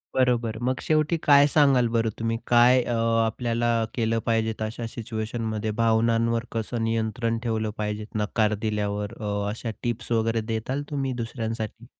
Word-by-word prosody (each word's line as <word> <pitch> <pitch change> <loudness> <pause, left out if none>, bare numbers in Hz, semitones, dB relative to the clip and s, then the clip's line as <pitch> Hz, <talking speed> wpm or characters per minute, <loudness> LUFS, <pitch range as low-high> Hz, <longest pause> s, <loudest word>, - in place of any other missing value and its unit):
बरोबर. 120 -3 +1
मग 130 +1 0
शेवटी 155 +2 +1
काय 145 -1 +7
सांगाल 135 -5 +4
बरं 115 -1 +2
तुम्ही, 115 0 -1
काय 120 +1 +6
अ, 120 - -2 0.3
आपल्याला 120 +1 -1 0.2
केलं 115 -1 0
पाहिजे 110 -1 +1
तशा 110 +2 -3
सिच्युएशनमध्ये? 110 -1 -3
भावनांवर 115 0 +2
कसं 115 +1 -2
नियंत्रण 115 +1 -1
ठेवलं 110 -2 -1
पाहिजे? 105 0 -3
नकार 105 0 +1
दिल्यावर 105 0 -2
अ, 100 -1 -2
अशा 115 +2 -4
टिप्स 120 0 -3
वगैरे 115 0 +1
द्याल 130 +6 -2
तुम्ही 135 -3 -2
दुसऱ्यांसाठी? 115 -2 -5
115 Hz, 140 wpm, -25 LUFS, 110-120 Hz, 0.3 s, काय